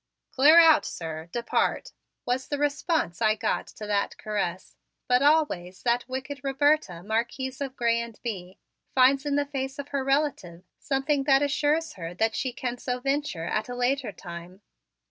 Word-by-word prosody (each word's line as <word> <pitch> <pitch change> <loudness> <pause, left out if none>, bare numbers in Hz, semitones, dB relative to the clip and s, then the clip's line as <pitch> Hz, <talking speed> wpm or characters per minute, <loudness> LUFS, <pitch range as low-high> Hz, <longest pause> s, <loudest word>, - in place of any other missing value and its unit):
"Clear 300 +5 +7
out, 325 -2 +7
sir! 160 0 -6
Depart!" 235 -1 -1 0.3
was 250 +2 -1
the 290 - -2
response 290 - -1
I 215 -1 +4
got - - -1
to 215 - -9
that 205 -1 -1
caress; 195 -4 -3 0.3
but 250 +1 +3
always 280 - +1
that 245 +1 0
wicked 265 +2 -5
Roberta, 275 - +1
Marquise 240 +5 -2
of 270 -1 -4
Grez 235 -2 +1
and 230 -2 -11
Bye, 190 -6 -5 0.4
finds 270 +2 +4
in 285 - +1
the 290 0 +1
face 270 -1 -4
of 285 0 -6
her 280 -2 -1
relative 270 - -1 0.2
something 275 0 0
that 275 0 +4
assures 300 +3 +1
her 170 -1 -7
that 220 +3 +1
she 260 - -1
can 245 0 -4
so 250 0 -3
venture 275 - -2
at 215 +6 -2
a 245 - -4
later 250 -1 0
time. 175 +2 -10
255 Hz, 165 wpm, -26 LUFS, 210-280 Hz, 0.4 s, Clear